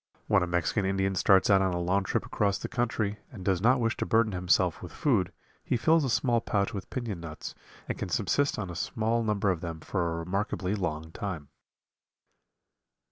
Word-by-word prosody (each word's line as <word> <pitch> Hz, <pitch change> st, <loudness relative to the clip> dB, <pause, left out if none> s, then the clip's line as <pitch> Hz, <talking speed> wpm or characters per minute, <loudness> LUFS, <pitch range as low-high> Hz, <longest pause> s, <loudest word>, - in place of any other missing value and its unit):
When 100 Hz, -3 st, +3 dB
a 90 Hz, -, 0 dB
Mexican 85 Hz, +4 st, 0 dB
Indian 95 Hz, 0 st, 0 dB
starts 95 Hz, 0 st, +4 dB
out 95 Hz, -1 st, +6 dB
on 95 Hz, -2 st, +1 dB
a -, -, -1 dB
long 95 Hz, +3 st, +1 dB
trip -, -, -1 dB
across 100 Hz, -2 st, 0 dB
the -, -, -5 dB
country 110 Hz, -3 st, -1 dB
and 95 Hz, -6 st, -9 dB
does 95 Hz, -3 st, +1 dB
not 125 Hz, +4 st, +4 dB
wish 115 Hz, -1 st, +1 dB
to -, -, -1 dB
burden 110 Hz, -1 st, +3 dB
himself 90 Hz, -1 st, +1 dB
with 90 Hz, -, -8 dB
food 100 Hz, -, +1 dB, 0.3 s
he -, -, 0 dB
fills 160 Hz, +6 st, +4 dB
a 135 Hz, -, 0 dB
small 120 Hz, 0 st, +2 dB
pouch 100 Hz, 0 st, 0 dB
with 100 Hz, -3 st, -6 dB
piñon 115 Hz, -8 st, -4 dB
nuts 80 Hz, -2 st, -7 dB, 0.3 s
and -, -, -4 dB
can -, -, -3 dB
subsist 145 Hz, 0 st, +1 dB
on 95 Hz, -5 st, -4 dB
a -, -, -7 dB
small 115 Hz, +5 st, 0 dB
number 105 Hz, -3 st, +1 dB
of 85 Hz, -3 st, -3 dB
them 85 Hz, -2 st, -5 dB
for 85 Hz, 0 st, -2 dB
a 80 Hz, -, -3 dB
remarkably 95 Hz, +1 st, -2 dB
long 80 Hz, -5 st, -3 dB
time. 90 Hz, -8 st, -5 dB
100 Hz, 200 wpm, -29 LUFS, 90-110 Hz, 0.3 s, out